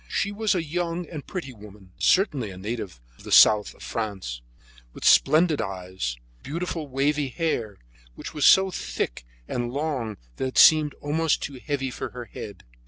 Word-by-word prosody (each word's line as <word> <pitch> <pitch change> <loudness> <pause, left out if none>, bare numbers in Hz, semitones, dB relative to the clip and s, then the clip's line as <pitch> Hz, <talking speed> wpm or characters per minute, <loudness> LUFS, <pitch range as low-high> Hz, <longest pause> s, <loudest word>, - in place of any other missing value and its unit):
She 200 - -1
was 210 0 0
a 175 - 0
young 170 +2 -3
and 155 -3 -9
pretty 170 -9 -5
woman, 105 -3 -15
certainly 145 - +2
a 95 - -10
native 105 - -5 0.2
of - - -15
the - - -8
south 105 -1 +6
of - - -14
France, 95 - -4 0.5
with - - -8
splendid 155 -1 +5
eyes, 90 - -4 0.2
beautiful 165 +1 -4
wavy 140 +2 0
black 130 - -13
hair, 115 - -1 0.4
which - - -8
was 150 - -3
so 190 0 +6
thick - - -4 0.2
and 120 -1 -2
long 135 -7 -3 0.2
that 130 - -1
it 130 - -6
seemed 155 -2 +6
almost 155 +2 0
too 135 -2 -6
heavy 135 -3 -2
for - - -5
her 120 - -5
head. 100 -2 -9
135 Hz, 170 wpm, -25 LUFS, 105-160 Hz, 0.5 s, south